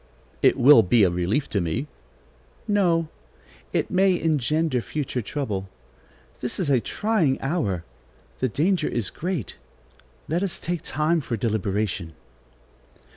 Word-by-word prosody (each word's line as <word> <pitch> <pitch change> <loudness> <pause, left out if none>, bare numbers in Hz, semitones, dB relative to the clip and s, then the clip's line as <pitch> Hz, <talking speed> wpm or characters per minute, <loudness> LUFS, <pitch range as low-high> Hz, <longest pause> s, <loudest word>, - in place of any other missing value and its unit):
"It - - +4
will 130 -1 +8
be 110 +2 +4
a 90 - +4
relief 90 +11 0
to 100 - +1
me." 80 -2 -2 0.8
"No; 175 -6 +2 0.6
it - - -1
may 185 -1 +3
engender 155 -2 +1
future 135 -1 -3
trouble. 100 -6 -4 0.7
This 125 - -3
is 165 -7 0
a 130 - +4
trying 185 - 0
hour; 135 - -1 0.6
the 130 - +1
danger 160 - +1
is 120 -4 -2
great; 175 - -4 0.7
let 165 +3 0
us 195 -3 -2
take 175 -2 -3
time 155 +4 0
for 120 -4 -3
deliberation." 100 -5 -1
135 Hz, 130 wpm, -24 LUFS, 110-165 Hz, 0.8 s, will